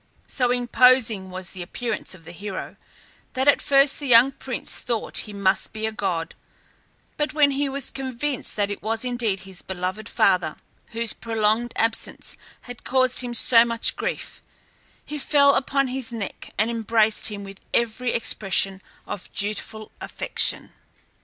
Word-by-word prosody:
So 250 -3 0
imposing 245 -4 +3
was 185 -1 -5
the 185 - -8
appearance 215 +2 -3
of 165 -4 -18
the - - -9
hero 190 +2 -7 0.6
that 260 +2 0
at 285 - +5
first 275 0 +4
the 285 - -5
young 245 +2 +6
prince 260 -2 -3
thought 235 -3 -3
he - - -7
must 200 -1 +1
be 220 0 -3
a 220 - -1
god; 175 -6 -3 0.8
but 300 0 -2
when 295 -2 +4
he 280 +1 -1
was 275 -1 +1
convinced 265 +1 0
that 205 -1 0
it 205 - -6
was 225 +3 -2
indeed 235 -6 -1
his 190 -1 -6
beloved 190 +3 -5
father, 180 -5 +2 0.4
whose 230 -1 -1
prolonged 225 +1 0
absence 225 0 -1 0.3
had 245 -1 -11
caused 255 -1 +2
him 245 -1 -2
so 230 0 +7
much 230 -1 0
grief, - - -5 0.6
he 300 0 -6
fell 280 0 +4
upon 275 0 +1
his 255 -2 -1
neck 220 -4 -6
and 215 +3 +1
embraced 220 -1 +2
him 205 -2 -4
with 195 0 -11
every 235 +1 0
expression 195 -3 +1 0.2
of 205 -3 -7
dutiful 215 +1 -3
affection. - - 0
230 Hz, 155 wpm, -23 LUFS, 200-255 Hz, 0.8 s, so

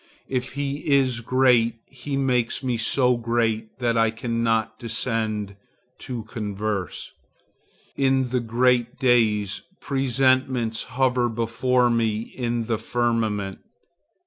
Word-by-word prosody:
If 130 -1 -3
he 140 0 -2
is 130 -4 +3
great 120 -1 +3
he 135 +1 -5
makes 125 -2 0
me 125 -2 0
so 125 +2 +2
great 115 -2 -1
that 120 -2 0
I 115 0 +4
cannot 115 -1 -1
descend 110 -4 -2 0.4
to 125 -4 -5
converse. 105 -3 -4 0.8
In 135 -2 +2
the 125 0 +1
great 120 +1 +1
days, 110 -6 +2 0.2
presentiments 130 -3 +1
hover 125 -2 +2
before 120 +2 +1
me 115 -2 +1
in 120 -1 -3
the 115 -2 -1
firmament. 110 -4 -1
120 Hz, 110 wpm, -24 LUFS, 110-130 Hz, 0.8 s, I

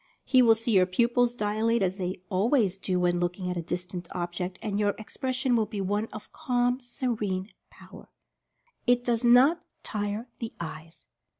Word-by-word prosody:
He 255 -2 +5
will 230 -2 +6
see 225 +1 -2
your 185 -3 +5
pupils 240 +5 +2
dilate, 220 +1 +1
as 190 +1 -1
they 180 0 -3
always 200 -1 +2
do 185 -2 0
when 175 0 +2
looking 180 +1 -2
at - - -3
a 170 - -2
distant 175 +1 -5
object, 180 +1 -3
and 205 -2 -2
your 205 -1 +1
expression 255 +3 -1
will 220 -2 +2
be 210 -1 -5
one 205 +3 -1
of 215 - -10
calm, 245 0 0
se 245 +1 -7
rene 205 -5 -2 0.2
power. - - -14 0.8
IT 245 0 +4
DOES 240 -1 0
NOT 260 +8 +6 0.2
TIRE 205 +2 -3
THE 230 -2 -5
EYES. 165 0 -8
210 Hz, 175 wpm, -27 LUFS, 185-240 Hz, 0.8 s, will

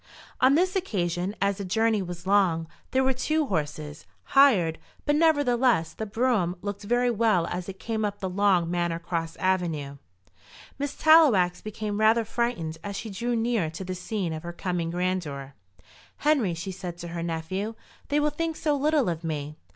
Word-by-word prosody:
On 260 +2 +5
this 365 +4 +2
occasion, 185 - -1
as 200 -1 +1
the - - -3
journey 220 +3 +1
was 175 -1 -7
long, 185 -5 +2 0.2
there 265 0 +2
were 265 0 +2
two 310 +4 0
horses 150 - -4 0.3
hired; 210 - +5 0.3
but, 290 - +2
nevertheless, 255 - +3
the 220 - -5
brougham 215 -5 +1
looked 205 -1 -4
very 240 +3 +1
well 215 -6 +2
as 180 +2 -4
it 190 - -7
came 220 -1 -2
up 205 -1 -2
the 190 - -2
long 185 -3 +2
Manor 175 -1 0
Cross 165 -1 -3
avenue. 165 -7 -1 0.8
Miss 285 0 -3
Tallowax 250 - +5
became 215 -1 -4
rather 220 +1 +4
frightened 215 -9 -2
as 200 -1 -5
she 220 +2 -5
drew 235 +5 -2
near 225 -7 0
to 165 +4 -7
the 185 0 -4
scene 185 -2 -3
of 155 - -5
her 175 +1 -7
coming 175 -1 -2
grandeur. 170 -6 -2 0.6
"Henry," 270 - +2
she 170 +4 -5
said 180 -2 -7
to 175 0 -7
her 170 0 -4
nephew, 170 +6 -3 0.3
"they 290 +1 +2
will 300 0 +1
think 325 +1 -2
so 300 -2 0
little 295 -2 +2
of 170 -1 -2
me." 150 -2 -4
195 Hz, 175 wpm, -26 LUFS, 170-240 Hz, 0.8 s, On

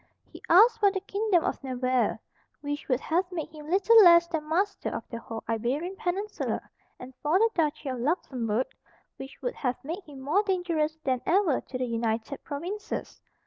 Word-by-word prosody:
He - - -14
asked 450 +6 +7
for 410 -2 +5
the 385 - -2
kingdom 395 -2 +1
of - - -2
Navarre, 255 -1 0 0.4
which 290 0 -4
would 255 0 +1
have 355 +3 0
made 330 -4 -4
him 305 -1 -11
little 425 +5 +6
less 340 -1 +8
than 315 -3 -4
master 390 +5 0
of - - -6
the 230 - -4
whole 225 -1 -7
Iberian 255 - -2
peninsula, 400 +1 -2 0.4
and 255 +1 -10
for 305 +4 +3
the 450 +3 +3
duchy 305 -3 -1
of 255 -2 -3
Luxemburg, 250 - -1 0.5
which 270 0 -10
would - - -1
have 250 - -2
made 335 +8 -5
him 285 -3 -11
more 295 +10 +2
dangerous 345 -6 -1
than 255 -2 0
ever 350 -6 +3
to 255 - -6
the 255 - -1
United 230 +2 -2
Provinces. 355 +9 -5
315 Hz, 180 wpm, -27 LUFS, 260-380 Hz, 0.5 s, less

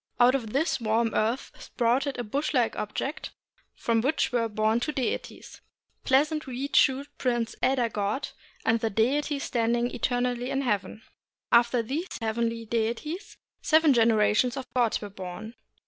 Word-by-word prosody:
Out 245 +1 +6
of 235 -6 -2
this 280 0 0
warm 225 +1 +1
earth 225 +4 0
sprouted 260 +4 0
a 245 - -2
bush 285 +7 -2
like 240 -3 +2
object 275 - -4 0.5
from 230 -1 +1
which 275 +4 +1
were 235 -2 0
born 215 +2 +1
two 300 - -2
deities, 265 -4 -4 0.4
Pleasant 300 +3 +2
Reed 265 +3 -4
Shoot 275 +1 +4
Prince 240 -3 0
Elder 255 -2 +2
God, 210 +4 -2 0.4
and 225 +1 +3
The 225 - 0
Deity 275 +8 +1
Standing 240 -2 0
Eternally 245 0 -1
in 270 - 0
Heaven. 210 -2 -2 0.5
After 235 0 +4
these 295 +11 -3
heavenly 230 +1 -2
deities 235 - -3 0.2
seven 315 -2 +4
generations 230 +2 +3
of 265 - -4
gods 240 -4 +1
were 205 - -6
born. 190 +4 -8
240 Hz, 145 wpm, -27 LUFS, 225-270 Hz, 0.5 s, Out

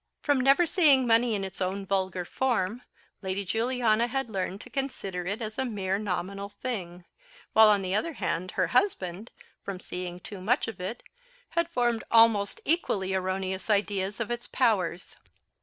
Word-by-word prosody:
From 285 -4 +2
never 275 +7 +5
seeing 295 -7 +5
money 230 0 +3
in 195 - -2
its 190 0 -6
own 195 +2 -2
vulgar 190 -2 -1
form, 235 -1 -1 0.4
Lady 195 +1 -3
Juliana 230 +1 +1
had 270 -2 -3
learned 190 -1 -3
to - - -9
consider 200 -10 -4
it 205 +4 -2
as 215 +2 -5
a - - +2
mere 200 -5 -2
nominal 200 0 -3
thing; 190 -6 -5 0.5
while, 220 -1 +8
on 205 -2 +3
the 185 0 -2
other 325 +11 0
hand, 185 - -2
her 185 - +3
husband, 200 - 0 0.3
from 195 -2 -6
seeing 180 -1 -6
too 190 +1 -9
much 240 +9 +1
of 225 - -7
it, 205 +7 -5 0.5
had 335 0 0
formed 240 -6 0
almost 225 -3 +4
equally 200 - +1
erroneous 190 +1 -2
ideas 200 -1 0
of 230 0 -3
its 240 0 -4
powers. 195 -8 0
205 Hz, 165 wpm, -28 LUFS, 190-240 Hz, 0.5 s, while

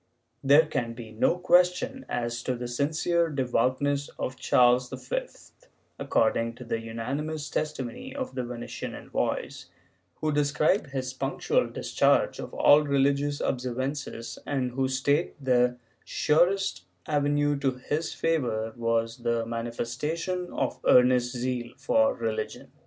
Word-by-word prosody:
There 145 +4 +6
can 120 -6 -2
be 115 -2 -9
no 110 +10 +2
question 180 +10 +2
as 120 0 -2
to 130 0 -2
the 120 0 -5
sincere 160 +6 +1
devoutness 140 +1 0
of 130 - -3
Charles 125 0 +3
V, - - -3 0.7
according 115 -4 +1
to 125 - -10
the 115 -1 -2
unanimous 140 +7 -4
testimony 150 - -3
of 260 -2 -4
the 130 - -2
Venetian 120 -1 -6
envoys, - - -3 0.5
who 155 - -1
describe 150 +6 +2
his 130 -1 -4
punctual 140 - 0
discharge - - +1
of - - -6
all 145 +1 +6
religious 140 0 +1
observances 125 -1 -3
and 130 -3 -1
who 130 +1 0
state 140 +5 +1
that 140 - -14 0.3
the - - -20 0.3
surest 190 +6 +1 0.2
avenue 145 -1 +1
to 135 -2 +1
his 150 +5 -3
favor 120 -9 -1
was 115 -1 0
the 115 -1 -1
mani 115 0 -3
festation 160 +10 -3
of - - -1
earnest 125 -1 +5
zeal 120 -1 -3
for 275 - +2
religion. 110 -1 -4
135 Hz, 130 wpm, -27 LUFS, 120-150 Hz, 0.7 s, There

